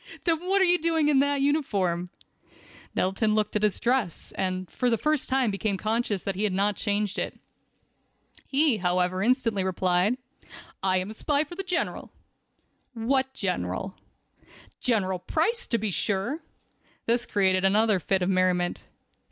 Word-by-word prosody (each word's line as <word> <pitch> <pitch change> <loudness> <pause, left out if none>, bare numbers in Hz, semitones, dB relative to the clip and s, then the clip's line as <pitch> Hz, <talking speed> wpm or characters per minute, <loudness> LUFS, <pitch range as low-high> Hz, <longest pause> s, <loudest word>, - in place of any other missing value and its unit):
Then 330 -3 +2
what 390 +1 +3
are - - +5
you 355 0 +3
doing 325 -1 +1
with 290 -2 +4
that 285 0 +2
uniform?" 195 - 0 0.9
Nettleton 210 +3 +1
looked 215 -1 0
at 210 - +1
his 210 -2 +2
dress, 240 -8 -1
and 185 -1 -2
for 250 - 0
the 230 - +2
first 305 +3 0
time 260 -4 +2
became 200 0 -1
conscious 215 -2 -1
that 195 - -2
he 195 +3 -3
had 205 -3 +1
not 200 +2 +1
changed 205 -1 -1
it. - - -4 1.1
He, 280 -3 +2
however, 180 0 +1
instantly 230 -3 +2
replied: 185 +4 +1 0.6
"I 185 -1 +2
am 185 +3 -2
a - - -7
spy 290 +6 +1
for 310 - -11
the 370 - -4
General." 360 -2 -2 0.8
"What 260 +3 +1
General?" 180 - -2 0.9
"General 190 -7 0
Price, 335 - 0
to 235 - +1
be 215 -2 -2
sure." 205 - -1 0.6
This 235 +1 +1
created 190 -2 +2
another 210 +1 +3
fit 190 +3 0
of 180 - 0
merriment. 180 -1 +1
210 Hz, 155 wpm, -26 LUFS, 185-265 Hz, 1.1 s, are